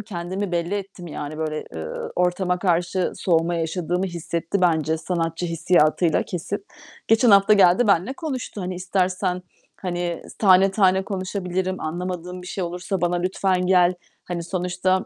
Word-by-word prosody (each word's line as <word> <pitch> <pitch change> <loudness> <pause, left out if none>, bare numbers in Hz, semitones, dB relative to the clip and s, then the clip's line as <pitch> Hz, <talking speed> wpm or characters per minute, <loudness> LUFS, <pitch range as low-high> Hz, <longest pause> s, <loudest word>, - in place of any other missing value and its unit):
kendimi 190 -1 -4
belli 170 +3 -1
ettim. 195 -3 -6
Yani, 155 0 -6
böyle, 155 -1 -3
ııı, 80 0 -5
ortama 180 0 +1
karşı 175 0 0
soğuma 170 -1 +1
yaşadığımı 175 +2 -1
hissetti 170 +2 -3
bence 160 -3 +2
sanatçı 165 0 -2
hissiyatıyla, 165 -1 +2
kesin. 195 +4 -5 0.4
Geçen 225 +1 +5
hafta 200 +1 +6
geldi, 195 +3 +5
benimle 200 +5 +3
konuştu. 275 - -5
"Hani, 180 0 -3
istersen, 185 0 -1 0.3
hani, 175 -2 -3 0.2
tane 190 -1 +6
tane 190 -1 +3
konuşabilirim, 185 -1 -3
anlamadığın 180 +2 -4
bir - - -11
şey 185 0 -3
olursa 180 +2 -3
bana 175 +1 +1
lütfen 185 0 0
gel. 180 -1 +4 0.3
Hani, 175 -1 -4
sonuçta 180 +1 0
180 Hz, 140 wpm, -23 LUFS, 170-190 Hz, 0.4 s, hafta